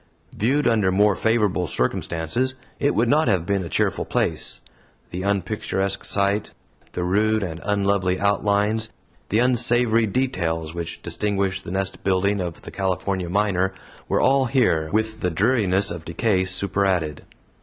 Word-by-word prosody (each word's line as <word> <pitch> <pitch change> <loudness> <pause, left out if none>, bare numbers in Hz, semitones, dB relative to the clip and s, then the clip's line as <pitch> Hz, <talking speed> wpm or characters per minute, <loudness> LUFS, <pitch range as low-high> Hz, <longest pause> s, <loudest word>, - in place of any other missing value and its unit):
Viewed 135 +7 +1
under 110 -5 +2
more 100 +1 +3
favorable 105 -6 +1
circumstances, 80 - -1 0.2
it 145 - +1
would 115 +2 +2
not 150 +3 +3
have 95 -6 +1
been 100 0 0
a 85 - -6
cheerful - - 0
place. - - -1 0.5
The 90 - -4
unpicturesque 95 0 -1
site, 100 +1 +1 0.4
the 90 - -2
rude 105 +4 +1
and 85 -3 -5
unlovely 100 -2 +1
outlines, 105 +2 +1 0.4
the 105 - +1
unsavory 120 -2 +3
details, 85 -10 -1
which 85 -1 -6
distinguish 100 -2 -1
the - - -9
nest 95 +1 -3
building 100 +1 +1
of 85 -2 -6
the - - -9
California 95 -1 -2
miner, 95 -1 +1 0.3
were - - +1
all 135 0 +3
here, 115 - +1
with 110 +1 -1
the 90 - 0
dreariness 100 0 +2
of 80 - -6
decay 95 +3 0
superadded. 95 -4 -1
100 Hz, 145 wpm, -23 LUFS, 90-110 Hz, 0.5 s, more